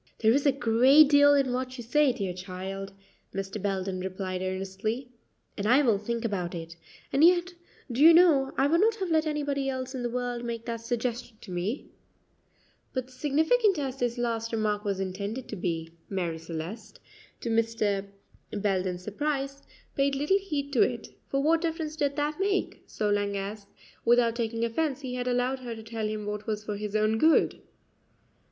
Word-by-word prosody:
"There 220 Hz, 0 st, +4 dB
is 280 Hz, +2 st, +2 dB
a -, -, +6 dB
great 260 Hz, +4 st, +5 dB
deal 285 Hz, 0 st, +7 dB
in 270 Hz, -3 st, +2 dB
what 255 Hz, +1 st, -3 dB
you 240 Hz, -, -6 dB
say, 280 Hz, +4 st, +3 dB
dear 195 Hz, -7 st, -3 dB
child," 190 Hz, +2 st, -6 dB, 0.4 s
Mr. 195 Hz, +1 st, -4 dB
Belden 190 Hz, -1 st, -2 dB
replied 185 Hz, 0 st, -4 dB
earnestly, 195 Hz, +7 st, -3 dB, 0.4 s
"and 205 Hz, 0 st, -2 dB
I 260 Hz, +6 st, +5 dB
will 225 Hz, -6 st, +3 dB
think 235 Hz, +2 st, -3 dB
about 180 Hz, -5 st, -2 dB
it; 165 Hz, 0 st, -7 dB, 0.4 s
and 280 Hz, -, +4 dB
yet, 350 Hz, +1 st, +5 dB, 0.4 s
do 245 Hz, +4 st, -1 dB
you 325 Hz, +2 st, +10 dB
know, 325 Hz, -6 st, +5 dB
I 270 Hz, -, +4 dB
would 330 Hz, +5 st, +3 dB
not 445 Hz, +1 st, +4 dB
have 380 Hz, -5 st, -3 dB
let 315 Hz, 0 st, +3 dB
anybody 285 Hz, -2 st, -1 dB
else 260 Hz, 0 st, -4 dB
in 260 Hz, -, -4 dB
the 240 Hz, -, -1 dB
world 245 Hz, 0 st, -3 dB
make 230 Hz, -1 st, -4 dB
that 230 Hz, -2 st, -4 dB
suggestion 240 Hz, 0 st, -3 dB
to 195 Hz, -, -10 dB
me;" 180 Hz, +8 st, -2 dB, 1.1 s
but 255 Hz, 0 st, -3 dB
significant 320 Hz, -, +2 dB
as 270 Hz, -3 st, -3 dB
this 245 Hz, -1 st, -1 dB
last 230 Hz, -1 st, -1 dB
remark 210 Hz, -2 st, 0 dB
was 200 Hz, -3 st, -1 dB
intended 200 Hz, +6 st, -4 dB
to -, -, -4 dB
be, 165 Hz, -3 st, -3 dB, 0.2 s
Marie 175 Hz, -4 st, -2 dB
Celeste, 165 Hz, +6 st, -7 dB, 0.4 s
to 235 Hz, -, -2 dB
Mr. 220 Hz, -3 st, 0 dB, 0.4 s
Belden's 185 Hz, -3 st, -1 dB
surprise, 275 Hz, +5 st, -2 dB, 0.3 s
paid 275 Hz, 0 st, +2 dB
little 300 Hz, +8 st, +2 dB
heed 290 Hz, -7 st, -4 dB
to 245 Hz, -, +4 dB
it; 240 Hz, -3 st, 0 dB, 0.2 s
for 275 Hz, 0 st, 0 dB
what 325 Hz, +2 st, +3 dB
difference 320 Hz, -2 st, -2 dB
did 285 Hz, -2 st, 0 dB
that 300 Hz, +2 st, -1 dB
make, 395 Hz, 0 st, 0 dB
so 210 Hz, -1 st, -1 dB
long 205 Hz, -1 st, 0 dB
as, 200 Hz, +1 st, -5 dB, 0.4 s
without 235 Hz, -1 st, +4 dB
taking 230 Hz, -1 st, -1 dB
offence, 275 Hz, +4 st, -1 dB
he 255 Hz, -2 st, -5 dB
had 250 Hz, 0 st, -3 dB
allowed 250 Hz, +1 st, 0 dB
her 240 Hz, -2 st, -6 dB
to 220 Hz, -, -9 dB
tell 220 Hz, -1 st, -3 dB
him 215 Hz, -1 st, -4 dB
what 210 Hz, 0 st, -5 dB
was 210 Hz, -1 st, -2 dB
for 210 Hz, -1 st, -4 dB
his 210 Hz, 0 st, -5 dB
own 215 Hz, +1 st, +2 dB
good? 320 Hz, +4 st, +4 dB
235 Hz, 185 wpm, -28 LUFS, 205-275 Hz, 1.1 s, you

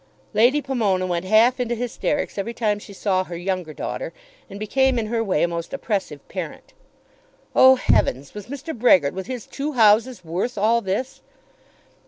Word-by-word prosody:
Lady 245 Hz, +7 st, +3 dB
Pomona 210 Hz, -9 st, 0 dB
went 175 Hz, 0 st, -2 dB
half 225 Hz, +6 st, +4 dB
into 240 Hz, -1 st, -1 dB
hysterics 245 Hz, +1 st, -2 dB
every 230 Hz, +4 st, -4 dB
time 210 Hz, -3 st, 0 dB
she 205 Hz, -, -12 dB
saw 190 Hz, -1 st, 0 dB
her 175 Hz, -2 st, -7 dB
younger 180 Hz, -2 st, -3 dB
daughter, -, -, -5 dB, 0.4 s
and 200 Hz, -, -9 dB
became 265 Hz, +4 st, +1 dB
in 225 Hz, -, 0 dB
her 225 Hz, +1 st, -1 dB
way 185 Hz, -8 st, +1 dB
a -, -, +3 dB
most 170 Hz, +3 st, -5 dB
oppressive 195 Hz, -, -3 dB
parent. 180 Hz, -5 st, -7 dB, 0.8 s
Oh, 260 Hz, 0 st, +8 dB
heavens; 135 Hz, -, +1 dB
was 210 Hz, -2 st, -8 dB
Mr. 280 Hz, +4 st, -6 dB
Brehgert 185 Hz, -, +4 dB
with 190 Hz, 0 st, -6 dB
his 250 Hz, -4 st, -5 dB
two 295 Hz, +2 st, -4 dB
houses 225 Hz, -2 st, +3 dB
worth 185 Hz, +9 st, -3 dB
all 225 Hz, +3 st, +3 dB
this? 200 Hz, +7 st, -3 dB
215 Hz, 170 wpm, -22 LUFS, 185-245 Hz, 0.8 s, Oh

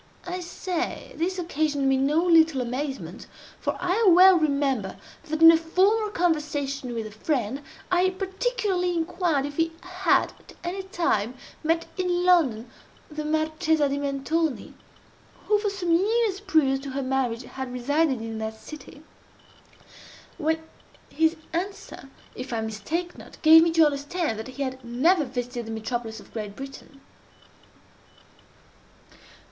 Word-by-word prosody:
I 360 Hz, 0 st, -4 dB
say, 355 Hz, 0 st, -4 dB
this 365 Hz, +3 st, -1 dB
occasioned 305 Hz, -5 st, 0 dB
me 270 Hz, -, +4 dB
no 290 Hz, +6 st, +2 dB
little 320 Hz, -5 st, +5 dB
amazement; 265 Hz, +3 st, -4 dB, 0.3 s
for -, -, -2 dB
I 365 Hz, +5 st, +1 dB
well 365 Hz, +2 st, +8 dB
remember 280 Hz, -, 0 dB, 0.3 s
that, 315 Hz, 0 st, -1 dB
in 330 Hz, -, +12 dB
a 330 Hz, -, +5 dB
former 390 Hz, +7 st, +2 dB
conversation 295 Hz, -, -1 dB
with 225 Hz, -1 st, -3 dB
a 215 Hz, -, -8 dB
friend, 245 Hz, +2 st, -2 dB, 0.3 s
I 365 Hz, +1 st, +4 dB
particularly 380 Hz, -1 st, -1 dB
inquired 335 Hz, -4 st, 0 dB
if 290 Hz, 0 st, -7 dB
he 330 Hz, 0 st, +1 dB
had 365 Hz, -1 st, +1 dB
at -, -, -16 dB
any 360 Hz, +3 st, -3 dB
time 330 Hz, -, -1 dB, 0.3 s
met 330 Hz, +1 st, +1 dB
in 355 Hz, -1 st, 0 dB
London 270 Hz, -11 st, +3 dB, 0.4 s
the 305 Hz, 0 st, -4 dB
Marchesa 315 Hz, 0 st, +1 dB
di 280 Hz, +1 st, -1 dB
Mentoni, 285 Hz, +2 st, -1 dB, 0.7 s
(who 420 Hz, -1 st, +3 dB
for 415 Hz, 0 st, 0 dB
some 375 Hz, -4 st, -2 dB
years 405 Hz, +3 st, +2 dB
previous 315 Hz, -9 st, +2 dB
to 275 Hz, +1 st, -7 dB
her 270 Hz, +1 st, -3 dB
marriage 255 Hz, -2 st, -1 dB
had 260 Hz, 0 st, -7 dB
resided 270 Hz, +1 st, +1 dB
in 225 Hz, -1 st, -5 dB
that 220 Hz, 0 st, -5 dB
city,) 305 Hz, +1 st, -11 dB, 1.4 s
when 320 Hz, 0 st, 0 dB, 0.5 s
his 320 Hz, +1 st, +2 dB, 0.2 s
answer, 360 Hz, -5 st, -5 dB, 0.2 s
if 255 Hz, +1 st, -7 dB
I 230 Hz, -1 st, -1 dB
mistake 260 Hz, -, -4 dB
not, -, -, -13 dB
gave 320 Hz, +1 st, +9 dB
me 335 Hz, -, +3 dB
to 325 Hz, -1 st, +6 dB
understand 290 Hz, -3 st, -1 dB
that 220 Hz, -, -6 dB
he 260 Hz, +2 st, -4 dB
had 260 Hz, -1 st, -5 dB
never 290 Hz, +8 st, +2 dB
visited 245 Hz, -2 st, -5 dB
the -, -, -5 dB
metropolis 225 Hz, 0 st, -4 dB
of -, -, -17 dB
Great 210 Hz, -3 st, -5 dB
Britain. 275 Hz, +1 st, -10 dB
310 Hz, 140 wpm, -25 LUFS, 265-355 Hz, 1.4 s, in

